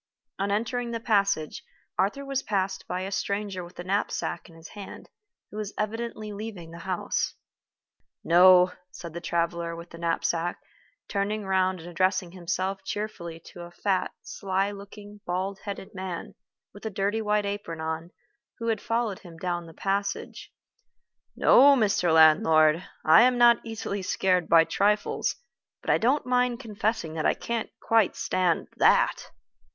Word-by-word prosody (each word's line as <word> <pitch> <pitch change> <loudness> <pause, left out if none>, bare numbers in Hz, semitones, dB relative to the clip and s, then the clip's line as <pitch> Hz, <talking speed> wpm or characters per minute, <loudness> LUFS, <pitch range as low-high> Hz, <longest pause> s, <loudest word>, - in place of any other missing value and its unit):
On 200 +1 0
entering 235 +4 -1
the 230 -1 -3
passage, 200 -8 0 0.3
Arthur 275 +8 0
was 275 -1 -1
passed 195 -5 -2
by 180 +1 -3
a 190 +1 -4
stranger 200 -2 -2
with 175 +1 -13
a - - -4
knapsack 185 -2 -2
in 165 - -16
his 165 0 -12
hand, 205 -2 -10 0.4
who 210 - -8
was 210 -1 -5
evidently 215 0 -3
leaving 200 -6 -7
the 170 - -9
house. 185 +1 -2 0.9
"No," 180 +1 +7 0.2
said 170 -3 -9
the 170 - -6
traveler 170 0 -1
with 170 +1 -10
the 170 - -10
knapsack, 170 0 -1 0.5
turning 205 +1 -2
round 185 -2 +1
and 165 - -10
addressing 185 +1 0
himself 190 +2 -3
cheerfully 190 -5 -5
to 175 - -9
a 175 - -8
fat, 185 +2 -1
sly 195 +1 -1
looking, 205 +1 -11
bald 190 +2 -2
headed 200 -2 -6
man, 185 -2 -6 0.4
with 205 - -13
a 220 - -2
dirty 205 +2 -1
white 210 -1 +1
apron 200 -5 -4
on, 160 +1 -4 0.5
who 230 -1 -3
had 220 -2 0
followed 230 -4 -1
him 170 -3 -13
down 175 -1 -3
the - - -11
passage, 200 +4 -3 0.8
"no, 280 +2 +7
Mr. 200 -7 +2
Landlord, 160 +1 +5 0.2
I 160 +8 +8
am 250 0 +4
not 240 -1 +6
easily 220 -3 -4
scared 185 -2 +1
by 165 -1 +7
trifles; 205 +5 0 0.4
but - - -1
I - - +3
don't 260 +6 +2
mind 250 -1 +1
confessing 215 -7 -2
that 160 -1 0
I - - +2
can't 235 -2 -3
quite 225 -4 +2
stand 180 -3 0
that." - - +3
195 Hz, 155 wpm, -27 LUFS, 175-210 Hz, 0.9 s, I